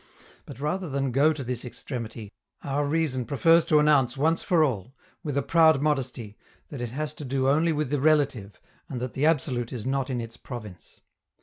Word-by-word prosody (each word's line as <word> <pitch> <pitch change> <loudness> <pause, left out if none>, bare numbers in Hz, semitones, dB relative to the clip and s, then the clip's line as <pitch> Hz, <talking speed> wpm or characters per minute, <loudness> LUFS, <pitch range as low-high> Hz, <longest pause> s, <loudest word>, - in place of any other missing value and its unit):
But, - - -10
rather 165 +5 -2
than 135 -1 -1
go 140 +5 +4
to 150 -3 -4
this 125 -1 -4
extremity, 115 -4 -7 0.3
our 145 +1 -1
reason 145 -4 0
prefers 165 +6 +4
to 155 - +4
announce 145 -5 +3
once 160 +4 +2
for 170 -3 +3
all, 125 -2 -2 0.3
with 145 -4 -3
a 140 - +1
proud 160 -2 +5
modesty, 130 -7 -2 0.3
that 140 -4 -7
it 120 - -3
has 150 +4 -4
to 150 - -9
do 135 0 -1
only 155 +5 +3
with 150 -3 -2
the 145 -2 0
relative, 140 -9 +1 0.3
and 130 - -4
that 125 -1 -4
the 145 +3 +1
absolute 130 -6 0
is 120 -5 -5
not 135 0 -1
in 125 -2 -2
its 115 0 -7
province. 105 -8 -10
135 Hz, 195 wpm, -26 LUFS, 125-150 Hz, 0.3 s, proud